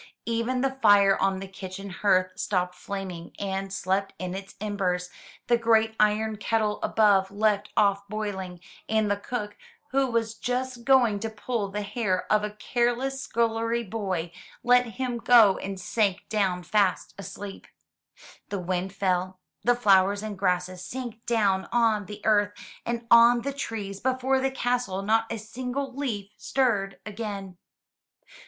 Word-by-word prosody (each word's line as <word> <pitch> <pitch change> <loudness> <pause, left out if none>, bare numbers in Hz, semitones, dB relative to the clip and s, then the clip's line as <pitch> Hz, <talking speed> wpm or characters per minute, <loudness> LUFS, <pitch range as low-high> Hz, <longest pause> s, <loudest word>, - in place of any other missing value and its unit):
Even 235 +2 -1
the 265 0 -1
fire 200 -1 +6
on 195 0 +1
the 195 - -6
kitchen 190 +1 -8
hearth 185 -1 +2
stopped 180 -1 -1
flaming 180 -2 -7
and 195 -1 -3
slept 195 +1 -1
in 185 -1 -4
its 195 0 -8
embers; 185 -4 -2 0.3
the 240 - +3
great 225 -1 +3
iron 215 +1 +2
kettle 215 0 0
above 200 -3 +3
left 205 0 +1
off 200 -1 +3
boiling, 195 -4 -4 0.3
and 220 -2 +2
the - - +3
cook, 210 0 -5 0.4
who 270 0 +2
was 230 -2 0
just 250 +1 -3
going 240 -6 +4
to 225 +2 -3
pull 220 0 -3
the 205 +1 -3
hair 205 -3 -1
of 210 0 +3
a 210 - -1
careless 245 +5 -1
scullery 230 0 0
boy, 190 -6 -3 0.3
let 245 0 +5
him 250 -2 -2
go 225 -5 +6
and 195 -1 -5
sank 200 0 0
down 190 -4 0
fast 200 -2 +1
asleep. 195 +1 -8 0.8
The 200 - -2
wind 185 +1 -2
fell, 185 -1 -1 0.2
the 245 0 +4
flowers 200 -3 +4
and 215 -1 -4
grasses 180 -1 -1
sank 240 0 -6
down 200 -5 +1
on 225 -4 +2
the 210 0 -9
earth 205 -1 +3 0.3
and 235 0 -2
on 235 +1 +7
the 280 - -2
trees 210 -7 -5
before 260 +2 +1
the 270 0 +1
castle 245 -7 -1
not 225 +2 +1
a 230 - -2
single 250 +4 -5
leaf 215 -8 -3
stirred 210 -7 0
again. 200 -4 -6
210 Hz, 150 wpm, -26 LUFS, 195-235 Hz, 0.8 s, on